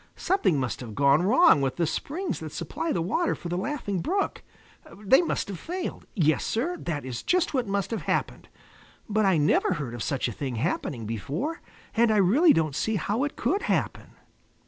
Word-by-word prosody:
Something 355 - +1
must 130 -2 -2
have 115 -5 -8
gone 140 +2 +4
wrong 245 - +5
with 135 -1 -1
the 170 - +1
springs 325 - -3
that - - -7
supply 330 - -3
the 165 - 0
water 330 - 0
for 175 - -7
the 175 - -2
Laughing 205 -3 -2
Brook. 390 - -1 0.6
They 210 - +4
must 340 - -2
have 195 -4 -6
failed. 360 +3 -5
Yes, 155 -6 +2
Sir, 295 +11 -1
that 150 -6 -4
is 125 -3 -5
just 360 -2 +1
what 255 -5 0
must 195 -1 -1
have 225 -5 -2
happened. 150 - -2 0.6
But 215 0 +1
I 190 -3 +4
never 150 +5 +3
heard 145 -8 -4
of 120 - -6
such 135 +4 -1
a - - -3
thing 130 +2 -4
happening 120 -2 -2
before, 140 - -3 0.3
and 235 0 +4
I 215 - +3
really 245 - +5
don't 155 -3 +1
see 220 - 0
how 210 +5 -1
it 290 - -5
could 400 +3 0
happen." - - -2
195 Hz, 195 wpm, -26 LUFS, -, 0.6 s, wrong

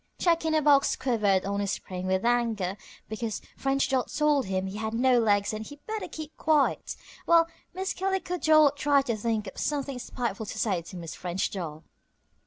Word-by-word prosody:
Jack 335 -2 +2
in 315 0 +2
a 310 - +2
box 280 -1 +4
quivered 210 -7 +1
on 200 +1 -1
his 200 -1 -1
spring 185 0 -5
with 190 +3 0
anger 230 -6 +1 0.3
because 220 0 -3 0.2
French 275 0 +1
Doll 260 -2 +1
told 295 -5 +1
him 190 0 -1
he 190 +2 -5
had 220 +1 -3
no 250 +1 +4
legs 205 -2 +2
and 215 0 -4
he 290 - -10
better 435 -1 -4
keep 310 -1 -8
quiet, 305 -3 +1 0.3
while 335 -1 +5 0.3
Miss 380 +1 -2
Calico 375 -2 -2
Doll 310 -2 +6
tried 285 -1 +2
to 235 - 0
think 215 0 -1
of 190 - -8
something 280 -3 -2
spiteful 235 -4 -4
to - - -6
say 190 -6 0
to 170 - -11
Miss 165 -2 -7
French 180 +1 -2
Doll. 160 -5 -6
235 Hz, 195 wpm, -27 LUFS, 200-295 Hz, 0.3 s, Doll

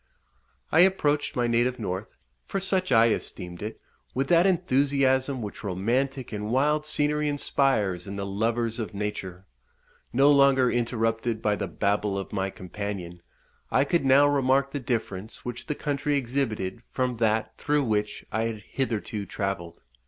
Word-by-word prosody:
I 160 - +4
approached 150 -6 +3
my 120 - +1
native 120 +2 +1
north, 100 -2 -5 0.3
for 195 - -2
such 185 -3 0
I 115 -1 +6
esteemed 90 -5 -4
it, 105 +2 -5 0.4
with 135 +2 0
that 175 +2 +5
enthusiasm 135 -5 +2
which 105 - -7
romantic 120 +7 -1
and 105 0 -3
wild 150 +5 +2
scenery 150 0 +1
inspires 120 -11 +1
in 100 - -5
the 100 0 -3
lovers 115 +3 -1
of 110 -2 -4
nature. 95 -3 -4 0.7
No 135 +4 +5
longer 140 -3 +5
interrupted 115 -1 0
by 105 -2 +1
the 100 - -3
babble 100 +3 0
of 95 - -5
my 95 -1 -1
companion, 95 -2 -6 0.5
I 135 - +3
could 165 +2 +1
now 135 +2 +6
remark 135 -1 +2
the 145 - -3
difference 110 -5 -4
which 125 +3 -6
the 150 - -1
country 145 0 -1
exhibited 120 -5 -2
from 125 -2 -1
that 110 0 +1
through 150 0 +1
which 105 -3 -1
I 110 +1 0
had 110 -2 -4
hitherto 110 -5 -2
travelled. 90 -4 -4
120 Hz, 150 wpm, -26 LUFS, 105-140 Hz, 0.7 s, I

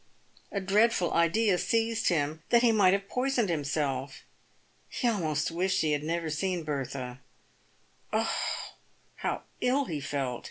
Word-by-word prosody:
A 200 - -1
dreadful 195 -1 +2
idea 180 +3 +3
seized 225 0 +1
him, 155 -2 0
that 235 0 +5
he 235 - +6
might 200 -4 +5
have 195 0 -1
poisoned 250 -4 0
himself. 140 -4 -2 0.7
He 250 - -1
almost 160 -9 0
wished 190 +3 +1
he 155 - +1
had 145 -1 +1
never 165 +1 -2
seen 180 +2 -1
Bertha. 135 -4 -4 0.9
Oh! - - +1 0.9
how - - -2 0.2
ill 270 +3 +2
he 155 - -4
felt. 135 -3 -2
170 Hz, 135 wpm, -29 LUFS, 150-215 Hz, 0.9 s, he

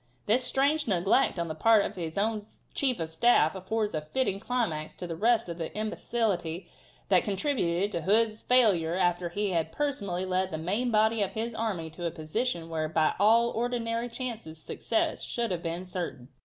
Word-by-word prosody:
This 240 +5 +3
strange 285 +3 +3
neglect 195 +4 +2
of 170 -1 -1
the 160 - -3
part 215 +6 +4
of 215 - -5
his 165 -2 -5
own 215 +1 0 0.3
chief 260 -6 0
of 160 -1 -3
staff 160 -2 +4
affords 210 +3 -2
a 155 - -1
fitting 195 +5 -1
climax 210 -10 -2
to 180 - -6
all - - -8
the 165 - -3
rest 225 +5 +2
of 170 0 -6
the 165 - -3
imbecility 195 -6 -2 0.4
that 185 -3 +5
contributed 200 - 0
to 170 - -2
Hood's 215 +4 +2
failure 195 -10 +3
after 175 -1 +1
he 205 +3 -1
had 165 -2 -1
personally 200 - -2
led 185 0 0
the 160 - -4
main 200 +10 0
body 220 0 +3
of 200 - -1
his 225 +2 -3
army 195 -8 -3
to 175 +2 -7
a - - 0
position 165 +4 -3
where 160 -1 -2
by 160 0 +2
all 230 +3 +5
ordinary 235 0 -2
chances 230 -10 -6
success 225 +7 -1
should 235 -3 -2
have 175 -2 -2
been 170 +2 -4
certain. 175 -9 -5
195 Hz, 190 wpm, -28 LUFS, 170-230 Hz, 0.4 s, that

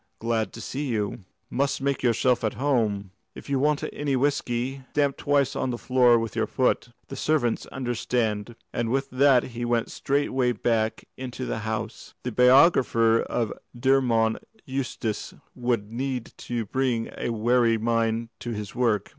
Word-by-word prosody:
"Glad 110 -3 -1
to - - -8
see 145 +2 -4
you. 105 -5 -2 0.3
Must 140 +2 0
make 140 0 -1
yourself 125 0 +2
at 110 - -1
home. 110 -8 0 0.2
If - - -9
you 135 - +2
want 150 +1 +1
any 145 -2 -1
whiskey, 130 -1 -1
stamp 145 -2 +2
twice 140 -2 +1
on - - -1
the 120 - -2
floor 125 -1 +4
with 115 -1 -3
your 110 -1 0
foot. 125 -1 +1 0.2
The - - -6
servants 140 -7 0
understand," 120 -3 -2 0.2
and 120 -1 -1
with 135 +2 -1
that 130 -1 +5
he 120 +1 -4
went 120 -1 0
straightway 135 -3 0
back 110 0 -1
into 130 0 -5
the 110 - -3
house. 110 +1 -5
The 125 - -2
biographer 125 -3 +5
of 115 -3 -2 0.3
Dermod 120 -4 +3 0.3
Eustace 130 -5 -3 0.2
would 120 -4 -1
need 125 0 -3 0.2
to 120 -2 -1
bring 125 0 -1
a - - -3
wary 115 0 +3
mind 115 0 0
to 120 - -6
his 105 -3 -5
work. 115 -5 +1
120 Hz, 155 wpm, -26 LUFS, 115-130 Hz, 0.3 s, that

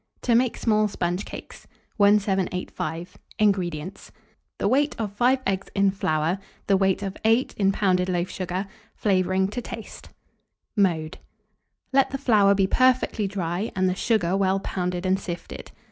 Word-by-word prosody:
TO 240 - +2
MAKE 240 +1 +2
SMALL 215 -2 +2
SPONGE 180 -1 -2
CAKES. - - -10 0.3
1785. 190 -4 0 0.2
INGREDIENTS. 185 -4 -1 0.5
The - - 0
weight 285 +6 +2
of 210 -3 -3
5 250 +5 +2
eggs 195 0 -1
in 200 -1 +3
flour, 165 -1 0 0.3
the 195 - +3
weight 190 +1 +1
of 195 0 -4
8 225 +4 +2
in 195 -1 +2
pounded 185 -2 +1
loaf 175 0 0
sugar; 185 +1 -4 0.3
flavouring 190 -1 +1
to 245 +4 -4
taste. 225 -1 -9 0.7
Mode. 170 -7 0 0.7
Let 270 0 +4
the 275 - -3
flour 210 -7 +4
be 195 -1 +3
perfectly 255 -2 +2
dry, 190 +1 -3
and 185 0 +2
the 185 - +1
sugar 190 -3 +1
well 195 0 +2
pounded 180 -2 -3
and 190 +1 +2
sifted. 165 - -7
195 Hz, 145 wpm, -24 LUFS, 180-210 Hz, 0.7 s, Let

